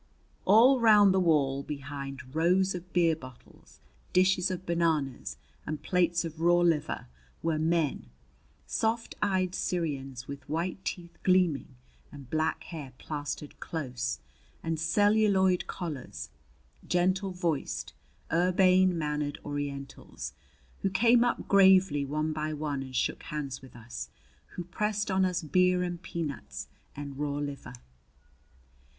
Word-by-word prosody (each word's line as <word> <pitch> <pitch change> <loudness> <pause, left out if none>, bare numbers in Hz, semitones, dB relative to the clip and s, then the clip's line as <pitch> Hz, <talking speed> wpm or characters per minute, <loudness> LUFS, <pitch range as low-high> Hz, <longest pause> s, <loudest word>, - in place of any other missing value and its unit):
All 240 +7 +7
round 210 -4 +7
the 190 - +3
wall, 145 -6 +2
behind 140 -2 -7
rows 180 +4 +3
of 180 0 -8
beer 170 -2 +3
bottles, 130 -5 -15 0.3
dishes 185 0 +4
of 185 0 -4
bananas, 160 -6 0 0.3
and 155 -1 -5
plates 175 -2 +2
of 160 0 -7
raw 175 +1 +5
liver, 165 -4 +1 0.4
were 160 -2 +1
men, 160 - 0 0.6
soft 225 +1 -1
eyed 185 -3 +1
Syrians 135 -9 -3
with 140 -1 -8
white 175 +5 -2
teeth 170 -2 -6
gleaming 180 -8 +2 0.4
and 140 -3 -12
black 155 0 0
hair 150 -7 -8
plastered 145 -1 -5
close 125 -5 -3 0.5
and 165 -1 -1
celluloid 195 +1 +3
collars, 125 - -6 0.6
gentle 185 +2 +1
voiced, 175 -5 -2 0.4
urbane 185 +1 +4
mannered 150 -2 -2
Orientals, 140 - -5 0.5
who 195 - 0
came 235 +5 +5
up 245 - -1
gravely 190 -7 +5
one 155 +2 -1
by 155 0 -2
one 145 -2 -2
and 130 -1 -8
shook - - 0
hands 140 -3 -5
with 130 -1 -14
us; 115 - -7 0.5
who 175 - -4
pressed 210 +3 -1
on 190 0 +3
us 180 -1 -1
beer 180 +3 +3
and 175 -1 -4
peanuts 140 - -5 0.3
and 140 -1 -7
raw 145 -1 -1
liver. 145 -3 -5
165 Hz, 125 wpm, -29 LUFS, 140-185 Hz, 0.6 s, All